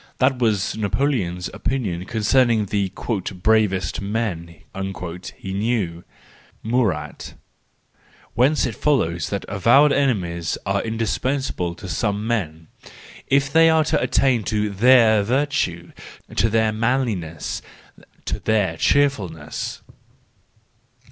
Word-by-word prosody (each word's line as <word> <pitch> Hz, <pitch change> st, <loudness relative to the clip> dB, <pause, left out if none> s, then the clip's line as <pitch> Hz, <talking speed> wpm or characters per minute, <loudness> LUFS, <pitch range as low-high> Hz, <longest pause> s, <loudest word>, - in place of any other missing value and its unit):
That 130 Hz, 0 st, +2 dB
was 110 Hz, -5 st, +1 dB
Napoleon's 105 Hz, -5 st, -1 dB
opinion 95 Hz, -10 st, -2 dB
concerning 115 Hz, 0 st, +2 dB
the 100 Hz, -1 st, -1 dB, 0.5 s
"bravest 105 Hz, -7 st, +2 dB
man" 100 Hz, -6 st, -3 dB, 0.8 s
he 95 Hz, -, -6 dB
knew, 100 Hz, -5 st, -1 dB, 0.6 s
Murat:—whence 115 Hz, -, -3 dB
it 125 Hz, -, -2 dB
follows 90 Hz, -, 0 dB
that 100 Hz, -, -3 dB
avowed 120 Hz, +9 st, +4 dB
enemies 90 Hz, -, 0 dB
are 100 Hz, 0 st, 0 dB
indispensable 115 Hz, -4 st, -2 dB
to 95 Hz, -, -9 dB
some 100 Hz, +4 st, -1 dB
men, 80 Hz, -9 st, -2 dB, 0.6 s
if 140 Hz, 0 st, +2 dB
they 165 Hz, 0 st, +6 dB
are 160 Hz, -1 st, +4 dB
to 155 Hz, 0 st, 0 dB
attain 125 Hz, -5 st, +2 dB
to 105 Hz, 0 st, -1 dB
their 110 Hz, 0 st, +5 dB
virtue, 115 Hz, -, -1 dB, 0.4 s
to 115 Hz, -, +2 dB
their 110 Hz, 0 st, +2 dB
manliness, 110 Hz, -, -2 dB, 0.6 s
to -, -, -3 dB
their 100 Hz, -7 st, 0 dB
cheerfulness. 95 Hz, -, -1 dB
110 Hz, 100 wpm, -22 LUFS, 90-125 Hz, 0.8 s, they